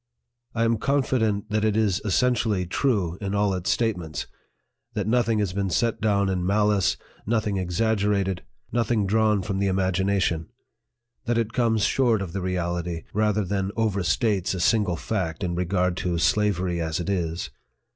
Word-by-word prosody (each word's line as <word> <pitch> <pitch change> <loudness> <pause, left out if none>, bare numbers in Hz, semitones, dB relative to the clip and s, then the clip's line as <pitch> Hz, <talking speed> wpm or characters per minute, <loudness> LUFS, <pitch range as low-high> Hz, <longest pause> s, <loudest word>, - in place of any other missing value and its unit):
I 115 - +1
am 115 -1 +2
confident 110 -7 0
that 110 0 +1
it 110 -1 +2
is 105 -4 +1
essen 125 +5 +2
tially 105 -6 -1
true 95 - 0
in 100 0 -2
all 100 -1 +2
its 90 -1 -2
statements; 90 - -1 0.7
that 105 - -1
nothing 115 0 +2
has 100 -4 0
been 100 -1 -1
set 115 +7 0
down 100 -2 +2
in 95 -2 -1
malice, 105 +1 +2 0.3
nothing 110 -3 0
exaggerated, 100 0 0 0.3
nothing 115 -2 +1
drawn 105 0 +2
from 95 0 -2
the 100 - +1
imagination; 95 -3 +1 0.8
that 120 0 +1
it 115 -1 -1
comes 115 -3 +2
short 115 -2 +2
of 85 -3 -7
the 95 - -2
reality, 85 -2 -2
rather 105 -1 +1
than 95 0 -1
overstates 100 -2 +1
a - - -4
single 100 -1 +2
fact 90 -2 -3
in 90 -1 -1
regard 90 0 0
to 90 -2 -1
SLAVERY 90 0 +1
AS 80 0 -2
IT 85 - -4
is. 85 -4 -2
100 Hz, 160 wpm, -25 LUFS, 90-110 Hz, 0.8 s, am